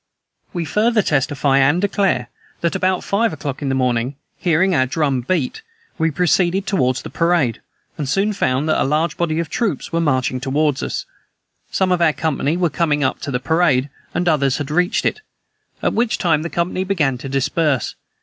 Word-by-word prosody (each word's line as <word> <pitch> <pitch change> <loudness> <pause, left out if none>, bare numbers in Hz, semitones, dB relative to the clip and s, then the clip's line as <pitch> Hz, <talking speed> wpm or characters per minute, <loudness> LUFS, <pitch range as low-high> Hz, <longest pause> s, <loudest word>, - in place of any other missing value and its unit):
We 170 -2 -3
further 215 +6 +2
testify 140 -1 +1
and 145 +5 +4
declare, 195 - 0 0.3
that, 170 -1 0
about 185 -1 +1
five 225 +3 +1
o'clock 140 -2 -5
in 140 - -1
the 135 - +1
morning, 125 0 0 0.2
hearing 180 +2 +2
our 130 -5 +2
drum 140 -3 0
beat, 140 0 -1 0.4
we 160 0 +2
proceeded 180 +3 +1
toward 130 -10 +1
the 145 - -6
parade, 165 -9 +1 0.4
and 145 -3 -2
soon 200 +7 +1
found 140 -6 0
that 155 - +2
a - - +4
large 155 +4 0
body 165 -2 -1
of 170 -1 -1
troops 195 - -2
were 165 - +2
marching 130 -4 +1
toward 145 0 0
us. - - -3 0.6
Some 190 -1 +1
of 180 -1 +2
our 160 -2 +4
company 155 0 -1
were 175 -3 +1
coming 150 -2 +1
up 130 - 0
to - - -5
the 125 -2 -1
parade, 145 -3 +2 0.2
and 175 0 -1
others 140 -5 +2
had 145 0 -4
reached 180 +4 +1
it, 430 - 0 0.6
at - - +1
which 235 0 +1
time 165 -4 +2
the 170 - -4
company 175 +2 -1
began 155 -10 0
to 135 - -6
disperse. 135 0 0
155 Hz, 190 wpm, -19 LUFS, 135-180 Hz, 0.6 s, and